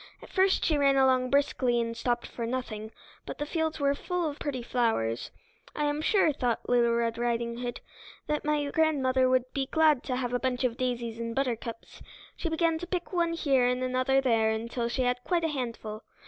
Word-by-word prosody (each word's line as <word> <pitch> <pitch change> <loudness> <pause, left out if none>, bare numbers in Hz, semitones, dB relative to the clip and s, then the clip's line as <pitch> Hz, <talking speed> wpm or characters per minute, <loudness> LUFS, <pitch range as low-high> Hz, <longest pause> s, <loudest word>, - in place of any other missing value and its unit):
At - - -14
first 380 0 +3
she 305 -3 +2
ran 275 -1 +4
along 260 -1 +3
briskly 260 -3 +2
and 230 0 -2
stopped 240 +1 -1
for 230 -1 -5
nothing, 225 -3 -4 0.4
but - - -6
the 295 - -2
fields 320 0 -2
were 280 0 +2
full 355 +3 -2
of 290 -1 -5
pretty 260 -4 -3
flowers. 225 - 0 0.5
"I 295 - -1
am 295 +1 0
sure," 355 -3 +3
thought 245 -4 -1
Red 235 -1 +2
Riding 235 0 -1
Hood 245 -1 -4 0.4
"that 300 0 -1
my 295 -1 0
grandmother 265 -5 +2
would 255 0 +1
be 270 -1 -1
glad 310 -4 +3
to 255 - -1
have 250 -1 -2
a 245 - +1
bunch 255 0 -1
of 245 -2 +1
daisies 240 -2 -3
and 230 0 -4
buttercups." 235 -4 -3 0.3
She 335 - -3
began 325 0 +1
to 355 - -6
pick 360 0 -3
one 340 -1 +1
here 270 -6 +2
and 250 +1 0
another 255 +1 +2
there 225 -4 +2
until 235 +2 -2
she 255 +2 0
had 250 0 0
quite 345 -2 0
a 325 - +1
handful. 230 -6 -4
255 Hz, 200 wpm, -28 LUFS, 235-295 Hz, 0.5 s, ran